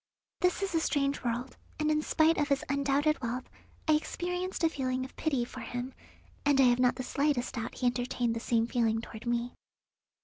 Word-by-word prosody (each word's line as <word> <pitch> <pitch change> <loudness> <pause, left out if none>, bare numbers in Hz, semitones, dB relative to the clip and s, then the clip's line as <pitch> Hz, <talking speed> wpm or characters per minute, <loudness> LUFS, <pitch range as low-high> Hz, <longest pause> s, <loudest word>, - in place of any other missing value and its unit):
This 360 +1 +2
is 390 - -2
a 330 - +3
strange 285 -3 0
world, 245 +2 -2 0.2
and 305 0 +2
in 305 0 +2
spite 315 +1 +3
of 295 - +2
his 280 -1 +1
undoubted 280 +2 +1
wealth 250 +1 -3 0.4
I 310 - +5
experienced 360 +4 -2
a 330 - +5
feeling 260 -3 -2
of 260 - -12
pity 275 -6 0
for - - -9
him, 245 +2 -5 0.5
and 285 -1 +3
I - - +8
have 245 -1 +5
not 250 -1 +4
the 255 - -4
slightest 280 -1 0
doubt 235 -2 -4
he 255 - -3
entertained 245 -1 0
the - - -2
same 230 0 +1
feeling 230 -2 +1
toward 225 +1 -9
me. 240 +1 0
265 Hz, 200 wpm, -30 LUFS, 245-305 Hz, 0.5 s, I